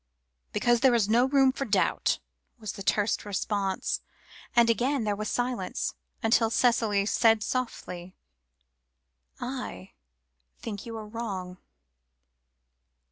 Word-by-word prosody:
"Because 240 Hz, -, +2 dB
there 255 Hz, -1 st, +5 dB
is 220 Hz, -4 st, +3 dB
no 235 Hz, +3 st, +4 dB
room 270 Hz, -1 st, +4 dB
for 275 Hz, -, -3 dB
doubt," 205 Hz, -6 st, +1 dB, 0.4 s
was 215 Hz, -3 st, -5 dB
the -, -, -9 dB
terse 205 Hz, +2 st, +1 dB
response, 200 Hz, -1 st, -1 dB, 0.5 s
and 235 Hz, -1 st, +6 dB
again 245 Hz, +3 st, +1 dB
there 210 Hz, -1 st, 0 dB
was 215 Hz, +1 st, -3 dB
silence, 245 Hz, -7 st, -2 dB, 0.3 s
until 225 Hz, 0 st, +4 dB
Cicely 225 Hz, -4 st, +2 dB
said 225 Hz, 0 st, +4 dB
softly 185 Hz, -8 st, -4 dB, 1.2 s
"I 170 Hz, -, -5 dB, 0.7 s
think 210 Hz, -1 st, -6 dB
you 225 Hz, -1 st, -5 dB
are 215 Hz, -, -6 dB
wrong. 195 Hz, -5 st, -5 dB
225 Hz, 115 wpm, -28 LUFS, 200-240 Hz, 1.2 s, and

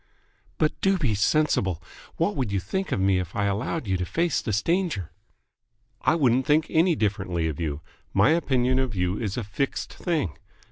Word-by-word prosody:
"But 155 Hz, -, +2 dB
do 195 Hz, 0 st, +3 dB
be 135 Hz, -11 st, 0 dB
sensible. 100 Hz, -, +2 dB, 0.4 s
What 170 Hz, +5 st, +1 dB
would 130 Hz, -8 st, -1 dB
you 100 Hz, -, +1 dB
think 190 Hz, -, -3 dB
of -, -, 0 dB
me 95 Hz, -1 st, +3 dB
if 90 Hz, -1 st, -5 dB
I 100 Hz, -, +1 dB
allowed 110 Hz, +10 st, -1 dB
you 95 Hz, -2 st, 0 dB
to 90 Hz, -, -2 dB
face 170 Hz, -2 st, 0 dB
this 105 Hz, -2 st, -1 dB
danger 165 Hz, -, 0 dB, 0.5 s
?" 120 Hz, +2 st, -47 dB
"I -, -, +3 dB
wouldn't 130 Hz, -4 st, +2 dB
think 155 Hz, +1 st, +4 dB
any 165 Hz, +1 st, +4 dB
differently 90 Hz, -, -1 dB
of 75 Hz, -3 st, -4 dB
you. 75 Hz, -3 st, -3 dB, 0.3 s
My -, -, +4 dB
opinion 130 Hz, -6 st, +2 dB
of 130 Hz, -4 st, -1 dB
you 90 Hz, +1 st, 0 dB
is 105 Hz, -3 st, -3 dB
a 120 Hz, -, -1 dB
fixed 105 Hz, +8 st, -3 dB
thing. 160 Hz, -, -2 dB
120 Hz, 190 wpm, -25 LUFS, 95-155 Hz, 0.5 s, think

